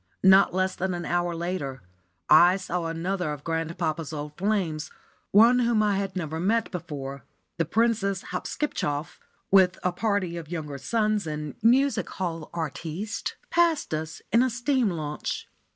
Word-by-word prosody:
Not 190 +1 +7
less 185 0 0
than 185 -1 -2
an 175 - -5
hour 175 0 0
later, 165 - -4 0.4
I 180 +2 +7
saw 180 -3 -3
another 175 +1 -2
of 145 -1 -9
grandpapa's 165 -1 -2
old 150 -1 -6
flames; 180 -5 -1 0.4
one 230 +5 +6
whom 235 -3 +3
I 205 -2 +2
had 195 -1 -3
never 160 -3 -3
met 220 +6 +1
before. 145 -6 -6 0.3
The 165 - +1
Princess 200 0 +1
Hopskipschoff, 175 - -3 0.3
with 190 -2 +5
a 180 - +2
party 190 -3 -1
of 160 -3 -8
younger 150 -5 -5
sons 215 - 0
and 150 -1 -4
music 265 +5 +3
hall 165 -4 -4
artistes, 170 +5 -4 0.2
passed 335 - +2
us 155 +1 -4
in 230 - +5
a 260 - +3
steam 245 0 +1
launch. 155 -4 -4
180 Hz, 150 wpm, -26 LUFS, 160-205 Hz, 0.4 s, Not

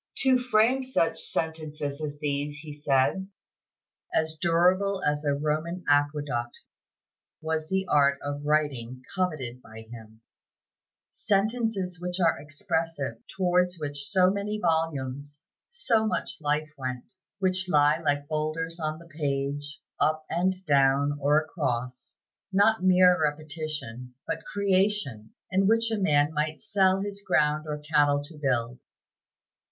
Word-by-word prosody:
To 260 -1 +4
frame 250 +2 +3
such 255 -10 0
sentences 155 -2 -4
as 145 -1 -4
these, 145 0 -2
he 150 -1 -9
said, 145 +6 +1 0.8
"as 160 0 0
durable 180 +4 +2
as 150 0 0
a 145 -1 +1
Roman 155 +5 -2
aqueduct," 145 -4 +1 0.8
was 160 0 -2
the 190 0 0
art 140 -2 +4
of 145 0 -4
writing 135 -5 -1
coveted 140 -10 -2
by 110 -2 -12
him; 110 -1 -12 0.9
"sentences 205 -3 -1
which 180 +1 -3
are 165 -3 +3
expressive, 160 - -3
towards 180 -1 +1
which 145 -2 -4
so 185 -2 +4
many 200 +1 -2
volumes, 145 -5 -1 0.3
so 225 - +1
much - - -3
life 150 +1 -1
went; 130 - -5 0.2
which 185 -1 0
lie 150 -1 +4
like 145 -3 -1
boulders 155 +2 -2
on 155 -1 -2
the 170 - -14
page, 145 -1 -3 0.2
up 155 0 +1
and 185 +2 0
down 140 0 +3
or 145 +2 +4
across, 130 -6 -4 0.4
not 205 +3 +4
mere 180 -2 +5
repetition, 150 -5 -4
but - - -3
creation, 195 - 0 0.2
and 190 +1 +3
which 225 +1 +2
a 220 - 0
man 150 -5 +3
might 155 +1 -1
sell 195 -3 +2
his 200 0 -5
ground 150 -4 +1
or 150 -1 -3
cattle 145 -1 +2
to 155 +3 -12
build." 125 -3 -1
155 Hz, 130 wpm, -27 LUFS, 145-185 Hz, 0.9 s, mere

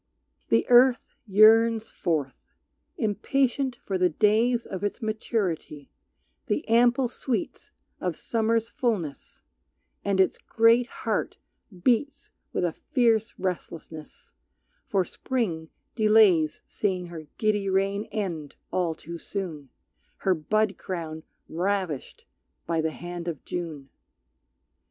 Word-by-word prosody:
The 115 0 +3
earth 250 +1 +6 0.2
yearns 225 +2 +5
forth, 150 -7 -2 0.5
impatient 255 +5 0
for 195 -5 -4
the 180 0 +4
days 225 +7 +2
Of 190 0 -6
its 205 - -2
maturity, 210 - -3 0.6
the - - -1
ample 245 +3 +4
sweets 255 +5 -4 0.3
Of - - -2
Summer's 230 0 0
fulness; 210 - -3 0.6
and 200 -1 0
its 190 - +3
great 230 +2 +4
heart - - -3 0.5
beats 270 +4 +1 0.2
With - - 0
a 175 - 0
fierce 235 -5 +1
restlessness, 165 -4 -6 0.5
for 190 -3 +1
Spring 175 -13 -3 0.2
delays 210 -8 +4
Seeing 185 -3 -2
her 160 -3 -9
giddy 210 -2 +1
reign 195 +2 +1
end 170 -9 -4 0.2
all 175 -3 0
too 170 +2 -8
soon, 165 -10 -5 0.5
Her 190 - +2
bud 205 +6 0
crown 160 -4 -5 0.3
ravished 180 -4 -2 0.4
by 165 -1 0
the 160 - 0
hand 175 +1 -7
of 165 -5 -5
June. 155 -6 -5
200 Hz, 110 wpm, -26 LUFS, 170-230 Hz, 0.6 s, earth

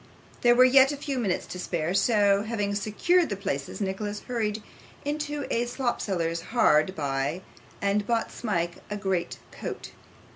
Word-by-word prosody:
There 240 0 +5
were 255 - +7
yet 265 +2 +6
a 290 - -4
few 275 -2 -3
minutes 200 -7 -1
to 180 - -7
spare, 170 -1 -2
so, 200 -1 +3
having 205 -2 -2
secured 270 - +2
the 200 - -1
places, 140 -9 -4
Nicholas 205 +1 -3
hurried 220 -3 -2 0.4
into 295 -1 -2
a 240 +1 +1
slopseller's 190 -10 -1
hard 185 -5 +3
by, 140 +4 -2 0.4
and 200 +1 +1
bought 230 -1 0
Smike 175 -7 -2
a 210 - -3
great 190 -3 -2
coat. - - -6
205 Hz, 150 wpm, -27 LUFS, 185-240 Hz, 0.4 s, were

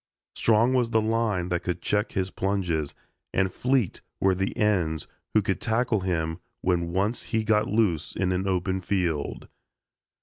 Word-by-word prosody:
Strong 115 +3 +3
was 125 -3 +2
the 110 - +3
line 110 -5 0
that 90 0 0
could 90 0 -2
check 105 +4 0
his 95 -1 -1
plunges, 90 -7 -1 0.4
and 95 0 +2
fleet 125 -6 0 0.2
were 95 -1 +3
the 95 +1 -2
ends 90 -7 +1 0.3
who - - +5
could - - -1
tackle 115 -1 +1
him 80 -3 -1 0.2
when 85 -2 +1
once 100 +6 0
he 110 -1 0
got 110 0 +2
loose 105 -8 +1
in 95 -1 0
an 95 +1 0
open 95 0 0
field. 85 -6 -1
95 Hz, 160 wpm, -26 LUFS, 90-110 Hz, 0.4 s, who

